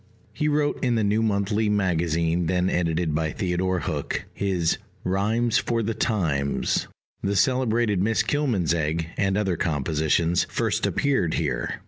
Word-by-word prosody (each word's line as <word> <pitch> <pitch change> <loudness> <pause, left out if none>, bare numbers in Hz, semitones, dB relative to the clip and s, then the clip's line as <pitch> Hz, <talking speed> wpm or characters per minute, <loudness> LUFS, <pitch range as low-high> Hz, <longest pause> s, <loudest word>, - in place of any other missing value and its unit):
He 150 - -1
wrote 145 -1 0
in 125 -2 +2
the 110 - +1
New 105 +2 +2
Monthly 105 0 +1
Magazine, 85 -4 +1
then 90 +1 +1
edited 85 -2 0
by 80 +1 0
Theodore 90 -1 -1
Hook: 75 -2 -3
his 90 -5 0 0.2
Rhymes 110 +5 +1
for 115 -1 -1
the 115 +2 -1
Times, 85 - 0 0.3
the 100 +1 -1
celebrated 120 -5 +2
Miss 110 +3 +2
Kilmansegg, 85 - 0
and 95 -1 +1
other 95 -4 0
compositions, 80 +2 +1
first - - 0
appeared 130 - +1
here. 70 -7 -1
95 Hz, 135 wpm, -24 LUFS, 80-110 Hz, 0.3 s, in